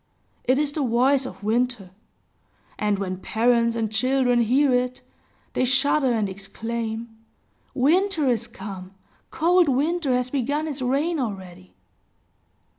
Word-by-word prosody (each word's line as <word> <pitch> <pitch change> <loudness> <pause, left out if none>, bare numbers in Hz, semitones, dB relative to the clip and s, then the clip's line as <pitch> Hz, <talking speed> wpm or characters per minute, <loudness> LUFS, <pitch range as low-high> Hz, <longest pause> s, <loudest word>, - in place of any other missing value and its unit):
It 255 +2 +3
is 295 0 0
the 300 - -3
voice 260 +2 +2
of - - -11
Winter; 225 -3 -1 0.9
and 210 -1 +1
when 185 -1 -3
parents 235 +3 +1
and 225 -2 -2
children 245 0 +2
bear 270 +1 +4
it, 250 0 -1 0.5
they - - +1
shudder 265 +1 +2
and 220 -3 0
exclaim, 225 +3 -5 0.6
"Winter 320 +3 +2
is 235 -2 0
come! 190 -2 -9 0.3
Cold 345 0 +3
Winter 295 +3 +1
has 250 0 -1
begun 285 +3 -1
his 290 -3 -5
reign 290 +6 0
already!" 185 -6 -6
250 Hz, 125 wpm, -24 LUFS, 220-280 Hz, 0.9 s, bear